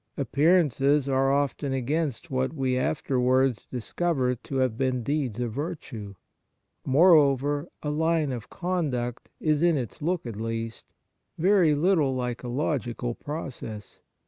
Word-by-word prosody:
Appearances 145 Hz, -1 st, +3 dB
are 135 Hz, 0 st, +2 dB
often 140 Hz, 0 st, 0 dB
against 145 Hz, +3 st, -2 dB
what 130 Hz, +2 st, 0 dB
we 130 Hz, -3 st, 0 dB
afterwards 130 Hz, -2 st, +1 dB
discover 130 Hz, +1 st, -1 dB
to 125 Hz, +3 st, -8 dB
have 130 Hz, -4 st, +1 dB
been 130 Hz, -1 st, 0 dB
deeds 135 Hz, -5 st, -1 dB
of 120 Hz, -2 st, -1 dB
virtue. 135 Hz, -, -6 dB, 0.7 s
Moreover, 145 Hz, -1 st, +4 dB, 0.2 s
a 150 Hz, -, -1 dB
line 160 Hz, -1 st, +1 dB
of 120 Hz, -4 st, -6 dB
conduct 145 Hz, -10 st, -2 dB
is, 155 Hz, -1 st, +1 dB
in 170 Hz, -2 st, +4 dB
its 120 Hz, -2 st, -5 dB
look 175 Hz, +1 st, -1 dB
at 115 Hz, -4 st, -6 dB
least, 115 Hz, 0 st, -4 dB, 0.5 s
very 175 Hz, -3 st, +4 dB
little 150 Hz, -4 st, +2 dB
like 125 Hz, -1 st, -3 dB
a 125 Hz, -, -6 dB
logical 120 Hz, -2 st, -2 dB
process. 125 Hz, -8 st, -7 dB
135 Hz, 130 wpm, -26 LUFS, 125-155 Hz, 0.7 s, Moreover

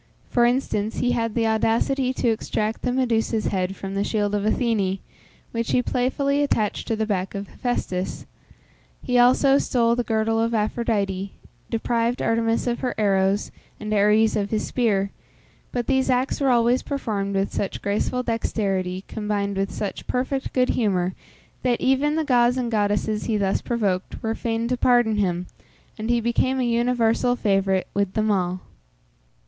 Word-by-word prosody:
For 240 Hz, -1 st, +4 dB
instance, 240 Hz, -4 st, 0 dB
he 245 Hz, -, +1 dB
had 230 Hz, -2 st, -1 dB
the 230 Hz, -1 st, +1 dB
audacity 230 Hz, +4 st, +1 dB
to 255 Hz, -2 st, 0 dB
extract 220 Hz, 0 st, -2 dB
the 250 Hz, -, 0 dB
Medusa's 230 Hz, -3 st, 0 dB
head 190 Hz, 0 st, -1 dB
from 195 Hz, 0 st, -6 dB
the 200 Hz, 0 st, 0 dB
shield 205 Hz, -1 st, -1 dB
of 205 Hz, -1 st, 0 dB
Athene, 215 Hz, -5 st, +1 dB, 0.5 s
which 230 Hz, 0 st, -2 dB
he 250 Hz, -, +3 dB
playfully 275 Hz, +4 st, 0 dB
attached 220 Hz, -7 st, 0 dB
to 225 Hz, -, 0 dB
the 220 Hz, 0 st, -1 dB
back 195 Hz, -3 st, -2 dB
of 200 Hz, 0 st, -4 dB
Hephæstus; 190 Hz, -7 st, -3 dB, 0.8 s
he 250 Hz, -1 st, +2 dB
also 270 Hz, +3 st, +5 dB
stole 235 Hz, -2 st, +2 dB
the 245 Hz, -, 0 dB
girdle 225 Hz, 0 st, 0 dB
of 230 Hz, 0 st, 0 dB
Aphrodite; 205 Hz, -3 st, -1 dB, 0.4 s
deprived 235 Hz, +1 st, 0 dB
Artemis 225 Hz, 0 st, +1 dB
of 240 Hz, -1 st, -1 dB
her 250 Hz, -, -2 dB
arrows, 195 Hz, -1 st, +1 dB, 0.3 s
and 215 Hz, 0 st, -3 dB
Ares 210 Hz, +2 st, +4 dB
of 205 Hz, -1 st, -1 dB
his 215 Hz, -1 st, -1 dB
spear, 200 Hz, -5 st, 0 dB, 0.6 s
but 245 Hz, -1 st, -2 dB
these 265 Hz, 0 st, +1 dB
acts 255 Hz, +3 st, +1 dB
were 275 Hz, -, +3 dB
always 240 Hz, +1 st, +3 dB
performed 210 Hz, -8 st, -3 dB
with 195 Hz, +1 st, 0 dB
such 195 Hz, -, -3 dB
graceful 215 Hz, +5 st, 0 dB
dexterity, 195 Hz, -5 st, -1 dB
combined 205 Hz, -2 st, -2 dB
with 195 Hz, 0 st, -1 dB
such 200 Hz, -2 st, -5 dB
perfect 265 Hz, +2 st, -2 dB
good 255 Hz, -1 st, +2 dB
humour, 185 Hz, -5 st, +1 dB, 0.5 s
that 245 Hz, -2 st, +1 dB
even 270 Hz, +3 st, +2 dB
the 320 Hz, -, +1 dB
gods 245 Hz, -3 st, +3 dB
and 240 Hz, -2 st, -1 dB
goddesses 210 Hz, 0 st, 0 dB
he 220 Hz, -2 st, 0 dB
thus 195 Hz, -1 st, 0 dB
provoked, 200 Hz, -6 st, -2 dB
were 225 Hz, 0 st, 0 dB
fain 230 Hz, 0 st, -2 dB
to 250 Hz, +1 st, 0 dB
pardon 240 Hz, -3 st, +3 dB
him, 180 Hz, -3 st, 0 dB, 0.5 s
and 220 Hz, +1 st, -5 dB
he 240 Hz, 0 st, +3 dB
became 235 Hz, +3 st, +1 dB
a -, -, +1 dB
universal 240 Hz, 0 st, +2 dB
favourite 195 Hz, -4 st, +1 dB
with 200 Hz, -1 st, 0 dB
them 215 Hz, -1 st, +1 dB
all. 185 Hz, -2 st, 0 dB
225 Hz, 165 wpm, -23 LUFS, 200-245 Hz, 0.8 s, also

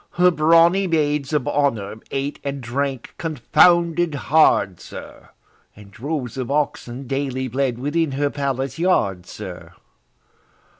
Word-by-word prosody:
Her 180 Hz, +1 st, +4 dB
brawny 170 Hz, +4 st, +4 dB
maids 150 Hz, -4 st, 0 dB
of 150 Hz, -5 st, 0 dB
honour 115 Hz, -8 st, 0 dB
ate 140 Hz, +1 st, -3 dB
and 140 Hz, 0 st, -3 dB
drank 130 Hz, +1 st, -3 dB
confounded 170 Hz, +2 st, +3 dB
hard, 140 Hz, -, +3 dB
sir, -, -, -11 dB, 0.5 s
And 100 Hz, -1 st, -15 dB
droves 130 Hz, +1 st, -4 dB
of 130 Hz, -, -3 dB
oxen 140 Hz, -3 st, -2 dB
daily 130 Hz, -1 st, -2 dB
bled 130 Hz, -1 st, -1 dB
within 145 Hz, +3 st, -1 dB
her 140 Hz, +1 st, 0 dB
palace 135 Hz, 0 st, -3 dB
yard, 100 Hz, -, +1 dB
sir! -, -, -9 dB
140 Hz, 120 wpm, -21 LUFS, 130-160 Hz, 0.5 s, Her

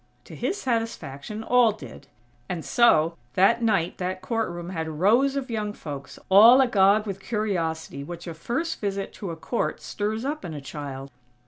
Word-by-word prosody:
To -, -, -12 dB
his 400 Hz, -, -2 dB
satisfaction, 220 Hz, -, -3 dB
all 240 Hz, -2 st, +4 dB
did; 215 Hz, -, -12 dB, 0.4 s
and 170 Hz, -3 st, -4 dB
so, 165 Hz, -9 st, +4 dB, 0.2 s
that 230 Hz, +6 st, +4 dB
night 200 Hz, -7 st, +1 dB
that 185 Hz, 0 st, -2 dB
court 225 Hz, -3 st, -1 dB
room 175 Hz, +1 st, -6 dB
had 160 Hz, -3 st, -3 dB
rows 245 Hz, +9 st, +4 dB
of 270 Hz, -3 st, -3 dB
young 210 Hz, -2 st, -2 dB
folks, 140 Hz, -7 st, -8 dB
all 225 Hz, +7 st, +8 dB
agog 210 Hz, -4 st, +4 dB
with 195 Hz, -2 st, -5 dB
curiosity 170 Hz, -, -2 dB
which 170 Hz, +3 st, -8 dB
a 170 Hz, -, -5 dB
first 245 Hz, -, -3 dB
visit 200 Hz, -1 st, -3 dB
to 195 Hz, -, -6 dB
a 165 Hz, -, -4 dB
court 230 Hz, +8 st, -2 dB
stirs 215 Hz, +3 st, -3 dB
up 300 Hz, +2 st, -3 dB
in 160 Hz, -, -6 dB
a -, -, -5 dB
child. 140 Hz, -1 st, -7 dB
200 Hz, 175 wpm, -25 LUFS, 165-230 Hz, 0.4 s, all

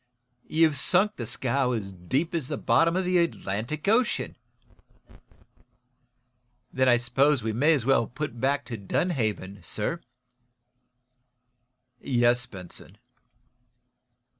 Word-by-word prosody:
"You've 160 Hz, -2 st, +3 dB
sunk 190 Hz, +7 st, +2 dB
the 120 Hz, -, -5 dB
scow 125 Hz, +2 st, 0 dB
as 100 Hz, -4 st, -4 dB
deep 130 Hz, -, -2 dB
as 160 Hz, -6 st, -2 dB
the 150 Hz, -, -3 dB
bottom 165 Hz, +1 st, +3 dB
of 185 Hz, 0 st, 0 dB
the 180 Hz, 0 st, +3 dB
Atlantic 150 Hz, -, -2 dB
Ocean." 230 Hz, +3 st, +1 dB, 2.4 s
"Then 130 Hz, 0 st, +3 dB
I 120 Hz, -, +6 dB
suppose 130 Hz, +2 st, +2 dB
we 110 Hz, -1 st, -1 dB
may 145 Hz, +8 st, +4 dB
as 135 Hz, -7 st, -1 dB
well 135 Hz, -4 st, +3 dB
put 125 Hz, -3 st, -6 dB
back 140 Hz, +2 st, +1 dB
to 115 Hz, -, -6 dB
Dunhaven, 105 Hz, -, -2 dB
sir?" 110 Hz, -, -3 dB, 2.0 s
"Yes, 125 Hz, 0 st, +2 dB
Benson." 95 Hz, -1 st, -11 dB
130 Hz, 115 wpm, -26 LUFS, 115-160 Hz, 2.4 s, I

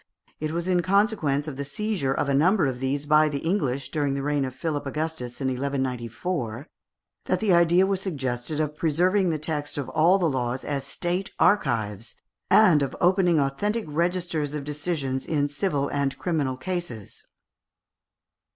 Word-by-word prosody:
It 155 Hz, -, -2 dB
was 170 Hz, +2 st, -3 dB
in 180 Hz, -1 st, +3 dB
consequence 185 Hz, -7 st, +1 dB
of 140 Hz, -4 st, -6 dB
the 140 Hz, -, -2 dB
seizure 205 Hz, -3 st, -2 dB
of 135 Hz, -, 0 dB
a 140 Hz, -, +1 dB
number 170 Hz, +6 st, +4 dB
of 130 Hz, -2 st, -2 dB
these 135 Hz, +2 st, -1 dB
by 155 Hz, +1 st, +4 dB
the 145 Hz, -, -2 dB
English, 140 Hz, -6 st, -1 dB
during 145 Hz, -3 st, 0 dB
the 140 Hz, -, -3 dB
reign 145 Hz, -1 st, 0 dB
of 130 Hz, -1 st, -6 dB
Philip 145 Hz, 0 st, -3 dB
Augustus 150 Hz, -4 st, -4 dB
in 135 Hz, -, -3 dB
1194, 130 Hz, -, -3 dB, 0.6 s
that -, -, +1 dB
the 210 Hz, -4 st, +2 dB
idea 170 Hz, +2 st, +5 dB
was 195 Hz, -1 st, -1 dB
suggested 135 Hz, -5 st, -3 dB
of 150 Hz, -1 st, -1 dB
preserving 180 Hz, +5 st, +2 dB
the 160 Hz, -, 0 dB
text 150 Hz, -1 st, -3 dB
of 135 Hz, -3 st, -3 dB
all 165 Hz, +6 st, +4 dB
the 185 Hz, -, 0 dB
laws 130 Hz, -2 st, -2 dB
as 140 Hz, -2 st, -3 dB
state 175 Hz, +5 st, -2 dB
archives, 115 Hz, -, +1 dB, 0.3 s
and 180 Hz, -9 st, +6 dB
of 140 Hz, -, -2 dB
opening 180 Hz, -2 st, +3 dB
authentic 205 Hz, +12 st, -1 dB
registers 165 Hz, -2 st, -1 dB
of 150 Hz, -, -4 dB
decisions 145 Hz, -3 st, -2 dB
in 145 Hz, -3 st, 0 dB
civil 145 Hz, -1 st, -1 dB
and 140 Hz, -1 st, -1 dB
criminal 145 Hz, -7 st, -1 dB
cases. 175 Hz, -, -5 dB
150 Hz, 165 wpm, -25 LUFS, 135-175 Hz, 0.6 s, and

